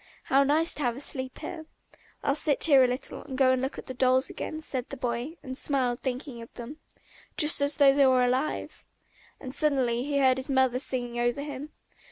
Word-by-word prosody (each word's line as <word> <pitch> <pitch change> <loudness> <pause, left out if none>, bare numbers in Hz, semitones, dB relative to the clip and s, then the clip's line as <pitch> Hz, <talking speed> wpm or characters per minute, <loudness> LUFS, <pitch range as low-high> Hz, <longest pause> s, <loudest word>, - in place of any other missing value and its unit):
How 270 +1 +3
nice 305 +4 +2
to - - -6
have 240 -3 -1
a - - -6
sleep 260 -2 -5
here! 315 0 -7 0.6
"I'll 280 - +2
sit 295 -1 +1
here 275 -5 +6
a - - +4
little 250 +2 -4
and 265 -3 -7
go 260 -1 +4
and 260 -1 +1
look 265 +1 -3
at - - -8
the 260 - -6
dolls 255 +1 +2
again," 310 - -5
said 265 -5 -2
the 275 - -7
boy, 245 +6 -3
and 260 -2 -6
smiled 260 -3 0
thinking 255 -1 -5
of 230 - -11
them. 245 +6 -8 0.6
"Just 300 -1 +4
as 285 +1 +1
though 275 -2 +6
they 275 -1 +4
were 255 -1 +4
alive!..." 255 +4 -2 0.6
And 260 -2 -8
suddenly 260 -6 +1
he 285 +1 -2
heard 260 -2 +4
his 265 +2 -6
mother 260 -2 +2
singing 245 -3 -2
over 240 +3 0
him. 290 0 -7
265 Hz, 215 wpm, -27 LUFS, 250-285 Hz, 0.6 s, here